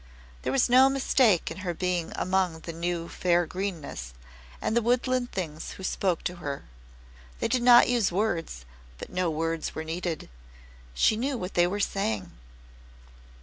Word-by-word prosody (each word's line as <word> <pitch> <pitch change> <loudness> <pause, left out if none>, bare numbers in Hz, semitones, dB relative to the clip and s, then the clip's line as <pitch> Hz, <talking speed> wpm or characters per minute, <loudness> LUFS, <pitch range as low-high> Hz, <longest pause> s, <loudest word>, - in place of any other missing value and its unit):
There - - -2
was 270 - +3
no 260 +2 +6
mistake 255 -8 +3
in - - -7
her 180 -2 -3
being 180 -1 -1
among 185 -3 0
the 165 - -7
new 170 0 -2
fair 175 0 +1
greenness, 160 - -5 0.4
and 220 - -1
the 235 - +4
woodland 245 +1 +1
things 160 -4 -5
who 190 - -10
spoke 185 -2 0
to 180 - -3
her. 140 -5 -5 0.8
They - - 0
did 245 +2 +1
not 240 0 +8
use 240 -6 +2
words, 175 - -2 0.3
but - - -9
no 180 -1 0
words 165 +1 -2
were 160 - -3
needed. 165 0 -4 0.7
She 140 - +4
knew 265 +3 -1
what 185 -3 -5
they 175 0 +4
were 200 +3 -2
saying. 110 - -1
180 Hz, 160 wpm, -27 LUFS, 165-225 Hz, 0.8 s, not